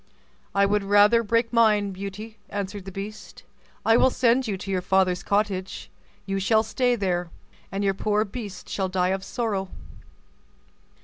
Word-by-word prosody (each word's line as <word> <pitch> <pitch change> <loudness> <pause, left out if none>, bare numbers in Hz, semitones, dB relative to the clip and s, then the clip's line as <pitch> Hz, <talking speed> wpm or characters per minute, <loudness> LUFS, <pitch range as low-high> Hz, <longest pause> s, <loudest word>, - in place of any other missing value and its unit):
"I 200 0 +4
would 205 0 +1
rather 205 +3 +5
break 230 +1 0
mine, 210 -3 +3
Beauty," 200 +3 -8
answered 200 -1 -5
the 195 - -7
beast; 205 +3 -8 0.4
"I 225 +1 +5
will 260 - +5
send 250 0 +2
you 200 -3 -2
to 195 +1 -6
your 185 -1 0
father's 185 -1 +2
cottage: 200 -2 -2 0.3
you 195 0 -2
shall 220 +3 +3
stay 245 +3 +1
there, 180 -5 -1 0.4
and 195 +1 -2
your 195 -1 +2
poor 210 +2 0
beast 205 -3 -8
shall 190 -2 -2
die 180 -1 +1
of 190 0 -1
sorrow." 200 -3 -2
200 Hz, 160 wpm, -25 LUFS, 190-220 Hz, 0.4 s, rather